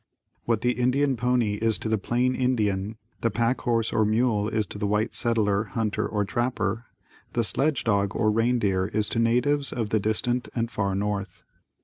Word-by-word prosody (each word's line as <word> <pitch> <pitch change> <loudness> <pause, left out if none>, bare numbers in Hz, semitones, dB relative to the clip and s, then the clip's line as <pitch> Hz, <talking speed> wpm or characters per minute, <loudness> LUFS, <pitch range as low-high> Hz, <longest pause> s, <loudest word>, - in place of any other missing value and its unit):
What 115 -2 0
the 125 - +2
Indian 130 +3 +1
pony 120 -3 0
is 115 -1 +2
to - - -5
the 110 -1 +1
plain 125 +5 0
Indian, 110 -5 -1 0.2
the 115 - +1
Pack 115 +3 0
Horse 115 -2 0
or 110 - +3
Mule 110 -1 +1
is 110 -1 -1
to 100 - -8
the 105 - -1
White 105 +3 0
Settler, 110 -3 +1
Hunter 110 -3 -2
or 105 -1 -1
Trapper, 115 +1 -2 0.5
the 120 - +1
Sledge 140 +5 +2
Dog 100 -3 +1
or 110 - +2
Reindeer 105 -5 +1
is 105 0 -1
to 115 - -1
natives 125 +5 +2
of 115 -3 -3
the 110 - +2
distant 120 +4 -1
and 115 -1 -1
Far 100 -2 -1
North. 100 -2 -3
115 Hz, 180 wpm, -25 LUFS, 105-120 Hz, 0.5 s, or